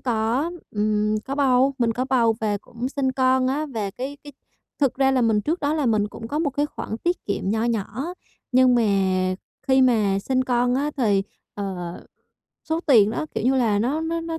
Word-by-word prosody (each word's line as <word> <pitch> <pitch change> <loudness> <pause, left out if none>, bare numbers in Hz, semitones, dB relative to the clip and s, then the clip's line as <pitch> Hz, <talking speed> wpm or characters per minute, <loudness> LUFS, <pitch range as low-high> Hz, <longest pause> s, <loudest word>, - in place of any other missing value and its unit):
có, 240 +6 0 0.2
ừm, 210 0 0
có 275 - -4
bầu, 270 -1 +3
mình 230 -1 +2
có 255 +3 -2
bầu 235 -4 +2
và 205 -2 0
cũng 245 +1 -5
sinh 270 -2 -1
con 260 0 +2
á. 300 +3 -1
Và 205 -3 -2
cái 265 +6 -6
cái 290 - -10 0.5
thực 275 -4 +2
ra 270 0 +3
là 255 -2 +2
mình 220 -2 +3
trước 320 - -2
đó 290 +2 0
là 295 -5 0
mình 210 -2 +2
cũng 225 +2 -9
có 295 - -2
một 315 -3 0
cái 290 +2 0
khoản 220 - -6
tiết 350 +1 -2
kiệm 195 -1 -2
nho 220 +2 0
nhỏ, 235 +3 -2 0.5
nhưng 255 0 +5
mà 240 - +3 0.9
khi 265 0 +5
mà 215 -6 +3
sinh 255 +5 0
con 245 0 +1
á 290 +3 0
thì, 205 -6 +2 0.3
ờ, 195 -2 -4 0.9
số 320 +1 0
tiền 220 -7 +6
nó, 305 - -3
kiểu - - -2
như 265 +1 +3
là, 220 -5 +2
nó 260 +9 0
nó 330 +1 -2
nó 330 0 -4
250 Hz, 210 wpm, -23 LUFS, 220-275 Hz, 0.9 s, tiền